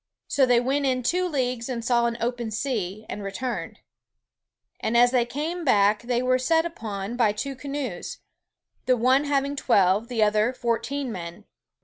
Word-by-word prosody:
So 270 -2 +3
they 245 -1 +5
went 275 +3 0
in 255 -1 0
two 360 +8 +1
leagues 250 -5 -2
and 235 -2 -4
saw 235 -1 +3
an 235 0 -3
open 240 -1 -2
sea, 215 -3 -3
and 210 - -6
returned; 220 +6 -4 1.0
and 225 +2 0
as 245 +1 +6
they 245 -2 +2
came 320 +7 -3
backe 210 -6 +3
they 245 0 -1
were 255 0 +2
set 325 +5 +2
upon 220 -9 -5
by 225 -4 +2
two 270 +6 -4
canoes, 270 -8 -5 0.7
the 255 -1 +4
one 260 +5 +3
having 280 0 0
twelve, 205 -4 +2
the 235 -3 +1
other 215 +3 +2
fourteen 245 +2 -2
men. 175 +1 -7
245 Hz, 165 wpm, -25 LUFS, 220-270 Hz, 1.0 s, as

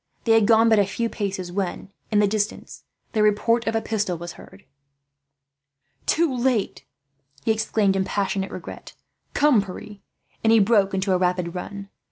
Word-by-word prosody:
They 230 - +1
had 225 -2 +5
gone 225 0 +5
but 220 -2 +5
a 200 - +4
few 230 +4 -2
paces 190 -5 -4
when, 190 0 -4 0.2
in 215 - +1
the 205 0 +4
distance, 210 +1 -3 0.3
the 220 - 0
report 225 +3 +2
of 225 - 0
a 225 - 0
pistol 205 -5 -1
was 175 0 -7
heard. 95 - -15 1.4
"Too 320 -5 +2
late!" 245 -4 -1 0.6
he - - +3
exclaimed, 215 -2 +1
in 190 - +1
passionate 195 0 -2
regret. - - -9 0.4
"Come, 285 -7 +4
Pierre," 200 +2 -9 0.5
and 225 - +4
he 225 - +6
broke 200 -2 +3
into 190 +1 0
a 180 - +2
rapid 180 -1 0
run. 200 +2 -7
205 Hz, 170 wpm, -23 LUFS, 195-225 Hz, 1.4 s, he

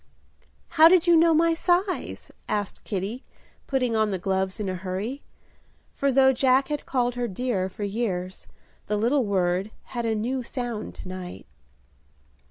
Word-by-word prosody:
"How 320 -1 +7
did 355 0 +5
you 345 -1 +6
know 330 0 +5
my 330 +1 +4
size?" 360 +3 -1 0.2
asked 205 -2 -2
Kitty, 205 +6 -3 0.4
putting 255 -4 0
on 215 -1 +2
the 195 - -1
gloves 190 +2 -1
in 210 - -2
a 185 - -1
hurry; 190 +9 -4 0.7
for 280 0 +1
though 265 0 +5
Jack 260 +2 +3
had 295 -1 -3
called 245 -2 +1
her 245 0 -2
"dear" 200 -3 -2
for 200 +2 -7
years, 195 -4 -3 0.4
the 210 - 0
little 245 +4 +2
word 185 0 0 0.2
had 235 -2 -2
a 220 - +1
new 250 +5 -1
sound 240 -3 -5
to - - -10
night. 185 -1 -7
235 Hz, 160 wpm, -25 LUFS, 195-270 Hz, 0.7 s, How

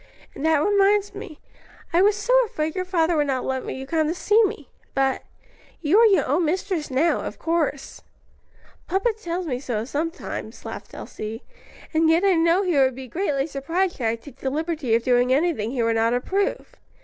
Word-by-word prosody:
"And - - -8
that 320 -1 +4
reminds 405 +1 +3
me; 360 -7 -9 0.5
I 345 - +4
was 410 +1 +4
so 415 +5 -1
afraid 310 -4 -3
your 370 -1 -2
father 345 -2 +1
would 295 -2 +1
not 260 -2 -1
let 260 -1 -3
you 265 - -5
come 315 +2 0
to 325 - -1
see 425 +5 +3
me. 295 -8 -5 0.3
But 270 -1 +1 0.6
you 345 +6 +3
are 460 - +7
your 380 -9 +3
own 295 +7 +1
mistress 345 0 -1
now, 275 +6 +2
of - - -6
course." 315 -4 -2 0.9
"Papa 390 +5 +1
tells 360 -4 -4
me 255 -6 -2
so 230 -5 -3
sometimes," 320 +7 -5
laughed - - -8
Elsie, 220 +2 -7 0.5
"and 320 0 +3
yet 330 +3 +3
I 390 - +5
know 335 +3 +3
he 350 -7 +1
would 260 -2 +3
be 260 0 -8
greatly 280 -1 -1
surprised 330 +6 -2
should 235 - -1
I 225 - +1
take 245 +3 -14
the 265 - -2
liberty 305 -4 -1
of 230 - 0
doing 245 0 +3
anything 275 -6 +1
he 245 -1 -1
would 230 0 +1
not 230 +2 +2
approve. 385 +11 -2
315 Hz, 195 wpm, -23 LUFS, 265-365 Hz, 0.9 s, are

